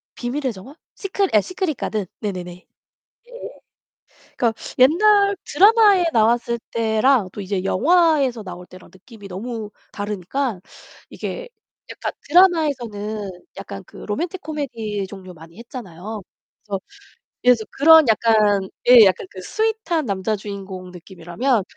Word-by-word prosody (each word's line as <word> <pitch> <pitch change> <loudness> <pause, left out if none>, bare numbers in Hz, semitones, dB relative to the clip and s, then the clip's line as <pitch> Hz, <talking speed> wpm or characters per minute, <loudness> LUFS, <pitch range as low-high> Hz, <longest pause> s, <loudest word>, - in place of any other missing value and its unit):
비밀의 255 +1 -3
정원? 210 +9 -12 0.2
시크릿 390 -1 -2
예 210 - +6
시크릿 360 - -3
가든 215 -3 -3 0.2
네네네. 185 -4 -4 0.8
예예. - - -10 0.8
그니까 235 -2 +1 0.3
옛날 400 +9 +5
드라마에 405 +2 +5
나왔을 235 +1 +2
때랑 225 -1 +2
또 - - -7
이제 190 -1 -3
영화에서 285 - +2
나올 180 -2 -9
때랑 185 0 -15
느낌이 200 +2 -14
너무 215 +3 -6 0.2
다르니까 205 +3 -3 0.5
이게 - - -6 0.4
약간 - - -5 0.2
드라마에서는 250 - +2 0.3
약간 195 0 -8
그 - - -15
로맨틱 340 - -4
코미디 235 -10 -4
종류 190 -2 -10
많이 165 +3 -15
했잖아요. 215 -4 -8 0.5
그래서 195 -2 -2 0.6
예 250 0 +7 0.2
그런 320 +2 +7
약간 215 -3 +3 0.2
예 240 -3 +10
약간 185 -1 +1
그 185 - -10
스윗한 435 - -1
남자 200 +1 -1
주인공 195 -2 -8
느낌이라면 185 +7 -2
225 Hz, 290 characters per minute, -21 LUFS, 195-300 Hz, 0.8 s, 예